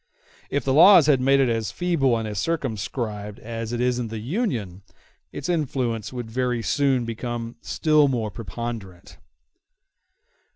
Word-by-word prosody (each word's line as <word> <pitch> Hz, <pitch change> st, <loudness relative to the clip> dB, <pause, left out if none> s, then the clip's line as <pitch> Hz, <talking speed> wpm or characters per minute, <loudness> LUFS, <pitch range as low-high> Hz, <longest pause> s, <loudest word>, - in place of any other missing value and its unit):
If 140 Hz, -, -1 dB
the 135 Hz, -, +2 dB
laws 170 Hz, +2 st, +8 dB
had 140 Hz, -4 st, +3 dB
made 135 Hz, +1 st, +4 dB
it 135 Hz, -, +4 dB
as 115 Hz, -2 st, -1 dB
feeble 155 Hz, -9 st, +1 dB
and 110 Hz, -1 st, -3 dB
as 105 Hz, -2 st, -3 dB
circumscribed 110 Hz, -, -3 dB
as 115 Hz, 0 st, -6 dB
it 120 Hz, -, -2 dB
is 125 Hz, 0 st, +1 dB
in 120 Hz, -, -2 dB
the 110 Hz, 0 st, -6 dB
Union, 115 Hz, -, -3 dB, 0.5 s
its -, -, -6 dB
influence 130 Hz, -, -1 dB
would 120 Hz, -3 st, -6 dB
very 125 Hz, -1 st, -1 dB
soon 135 Hz, -3 st, +1 dB
become 115 Hz, 0 st, -5 dB
still 155 Hz, -2 st, +3 dB
more 115 Hz, -5 st, -1 dB
preponderant. 100 Hz, -2 st, -7 dB
120 Hz, 150 wpm, -24 LUFS, 110-140 Hz, 0.5 s, laws